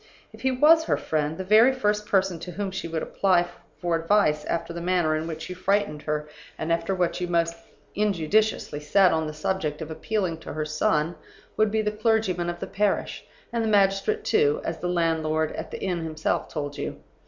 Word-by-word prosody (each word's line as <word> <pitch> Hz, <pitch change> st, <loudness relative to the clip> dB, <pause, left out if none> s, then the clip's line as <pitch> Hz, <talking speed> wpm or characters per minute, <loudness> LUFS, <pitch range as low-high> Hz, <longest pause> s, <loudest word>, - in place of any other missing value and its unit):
If -, -, -13 dB
he 265 Hz, -, +2 dB
was 310 Hz, +5 st, +5 dB
her -, -, +1 dB
friend, 155 Hz, 0 st, -1 dB
the 190 Hz, -, -3 dB
very 215 Hz, +6 st, +6 dB
first 210 Hz, -5 st, 0 dB
person 190 Hz, -3 st, +1 dB
to 180 Hz, -, -7 dB
whom 195 Hz, +1 st, -3 dB
she 190 Hz, -2 st, -4 dB
would 165 Hz, -1 st, -3 dB
apply 180 Hz, -3 st, +2 dB, 0.3 s
for 175 Hz, -2 st, 0 dB
advice 165 Hz, -3 st, +2 dB
after 170 Hz, 0 st, -2 dB
the 170 Hz, -, -5 dB
manner 175 Hz, -3 st, +1 dB
in 155 Hz, +1 st, -3 dB
which 160 Hz, -1 st, -6 dB
you 185 Hz, -, -5 dB
frightened 185 Hz, -4 st, 0 dB
her, 150 Hz, 0 st, -2 dB, 0.3 s
and 160 Hz, +1 st, 0 dB
after 170 Hz, +3 st, -1 dB
what 180 Hz, 0 st, 0 dB
you 180 Hz, -, -1 dB
most 170 Hz, -1 st, +1 dB, 0.4 s
injudiciously 205 Hz, -3 st, +1 dB
said 185 Hz, +5 st, +4 dB
on 160 Hz, -1 st, 0 dB
the 155 Hz, -, -5 dB
subject 155 Hz, -2 st, -2 dB
of 160 Hz, -1 st, -6 dB
appealing 185 Hz, -1 st, -2 dB
to -, -, -8 dB
her 155 Hz, 0 st, -2 dB
son, 155 Hz, +1 st, +1 dB, 0.4 s
would 215 Hz, 0 st, +3 dB
be 220 Hz, +1 st, 0 dB
the 210 Hz, -, 0 dB
clergyman 210 Hz, -5 st, +1 dB
of 175 Hz, 0 st, -5 dB
the -, -, -3 dB
parish 200 Hz, +1 st, -1 dB, 0.3 s
and 230 Hz, -1 st, 0 dB
the 220 Hz, -, 0 dB
magistrate, 200 Hz, -, +2 dB
too, 440 Hz, +2 st, +3 dB
as -, -, -3 dB
the 180 Hz, -, -2 dB
landlord 160 Hz, -2 st, +1 dB
at -, -, -6 dB
the -, -, -6 dB
inn 180 Hz, -3 st, -2 dB
himself 155 Hz, -1 st, -1 dB
told 145 Hz, -1 st, -5 dB
you. -, -, -4 dB
175 Hz, 205 wpm, -25 LUFS, 160-210 Hz, 0.4 s, very